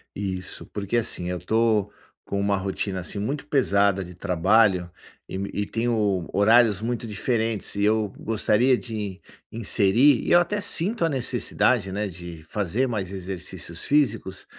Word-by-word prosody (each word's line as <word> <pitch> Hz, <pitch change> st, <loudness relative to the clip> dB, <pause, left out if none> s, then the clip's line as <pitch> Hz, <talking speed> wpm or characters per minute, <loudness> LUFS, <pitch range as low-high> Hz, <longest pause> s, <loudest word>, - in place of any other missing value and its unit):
Isso, 95 Hz, -2 st, -4 dB
porque 105 Hz, +3 st, -1 dB
assim, 90 Hz, -6 st, -1 dB
eu 90 Hz, 0 st, -3 dB
tô 110 Hz, +1 st, +1 dB, 0.4 s
com 100 Hz, -, -3 dB
uma 100 Hz, 0 st, +1 dB
rotina 95 Hz, 0 st, -3 dB
assim 90 Hz, +3 st, -4 dB
muito 140 Hz, +8 st, -3 dB
pesada 100 Hz, -9 st, +2 dB
de 90 Hz, 0 st, -10 dB
trabalho 90 Hz, +1 st, +2 dB, 0.4 s
e -, -, -5 dB
me 100 Hz, +1 st, -3 dB
e 105 Hz, -, -1 dB
tenho 105 Hz, -6 st, 0 dB
horários 110 Hz, 0 st, +4 dB
muito 120 Hz, 0 st, -3 dB
diferentes 110 Hz, 0 st, -1 dB
e 100 Hz, -, 0 dB
eu 110 Hz, -1 st, +2 dB
gostaria 115 Hz, +3 st, +2 dB
de 105 Hz, -6 st, -6 dB, 0.3 s
inserir, 115 Hz, +4 st, +3 dB
e -, -, 0 dB
eu 175 Hz, -, +8 dB
até 205 Hz, +4 st, 0 dB
sinto 200 Hz, 0 st, 0 dB
a -, -, +1 dB
necessidade, 125 Hz, -, 0 dB
né, 105 Hz, +1 st, -1 dB
de 85 Hz, -2 st, -9 dB
fazer 105 Hz, +6 st, 0 dB
mais 105 Hz, -7 st, -3 dB
exercícios 90 Hz, -3 st, -6 dB
físicos, 125 Hz, -10 st, 0 dB
105 Hz, 150 wpm, -24 LUFS, 95-120 Hz, 0.4 s, eu